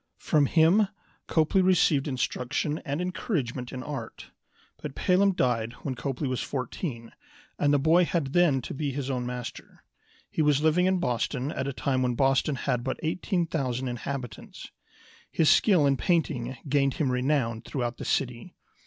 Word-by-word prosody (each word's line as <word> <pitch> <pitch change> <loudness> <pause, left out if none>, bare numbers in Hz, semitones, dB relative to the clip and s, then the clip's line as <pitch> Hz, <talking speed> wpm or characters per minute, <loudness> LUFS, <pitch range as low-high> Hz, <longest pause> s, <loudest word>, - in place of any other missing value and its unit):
From 145 -2 +2
him 170 +8 +4 0.4
Copley 160 +4 +2
received 170 -6 +3
instruction 135 +3 -2
and 140 +3 -3
encouragement 145 - -3
in 130 -1 -6
art. 145 -1 -7 0.5
But 145 -3 -6
Pelham 195 +1 +3
died 120 -7 0
when 135 - -2
Copley 135 +2 -3
was 130 -1 -2
fourteen, 125 -2 -5 0.5
and 145 - +3
the 145 - +4
boy 160 +5 +4
had 155 -6 -2
then 155 -8 +3
to - - -6
be 140 0 -2
his 135 0 -3
own 125 -2 -2
master. 125 -1 -7 0.5
He - - 0
was 150 -2 +3
living 170 +4 +3
in 190 0 +2
Boston 130 -3 -1
at 135 - -3
a - - -1
time 130 0 0
when 125 -1 0
Boston 135 +2 +2
had 125 -2 -1
but 130 - -3
18,000 155 -7 -1
inhabitants. 125 -2 -6 0.6
His 160 - +3
skill 180 -9 +4
in 140 -1 +3
painting 135 -8 0
gained 140 -1 +2
him 140 -5 0
renown 125 -3 0
through 135 - -4
out 120 0 -3
the - - -7
city. 125 -3 -2
140 Hz, 160 wpm, -27 LUFS, 125-160 Hz, 0.6 s, him